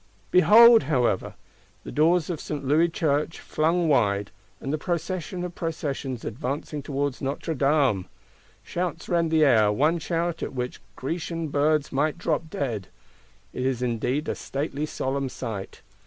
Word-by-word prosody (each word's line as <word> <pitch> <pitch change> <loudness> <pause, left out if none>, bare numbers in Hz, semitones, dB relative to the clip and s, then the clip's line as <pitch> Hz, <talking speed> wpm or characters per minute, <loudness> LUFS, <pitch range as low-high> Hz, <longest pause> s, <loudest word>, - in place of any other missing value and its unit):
Behold, 225 +5 +8
however! 125 -9 +1 0.5
The - - -7
doors 165 +3 +3
of 160 - -4
St. 145 -3 -5
Louis 155 +5 +3
Church 155 -1 0
flung 165 +2 +1
wide; 105 -8 +2 0.3
and 135 - -4
the 155 - -1
Procession 175 +1 -3
of 180 -1 -5
Processions 145 -7 -4
advancing 140 +5 -4
towards 140 -1 -2
Notre 140 +4 -2
Dame! 135 - +2 0.6
Shouts 175 -1 -3
rend 170 -2 +1
the 160 -1 +4
air; 110 -6 +5
one 155 +10 +2
shout, 170 +1 -2
at - - -4
which 125 -4 -4
Grecian 165 +2 -3
birds 150 +1 +1
might 150 +4 0
drop 160 -1 -1
dead. 115 -11 -3 0.7
It 125 - -3
is 130 -1 0
indeed 125 +4 -1
a - - 0
stately, 145 +1 -3
solemn 135 -1 -2
sight. 110 -7 -6
150 Hz, 145 wpm, -25 LUFS, 130-165 Hz, 0.7 s, Behold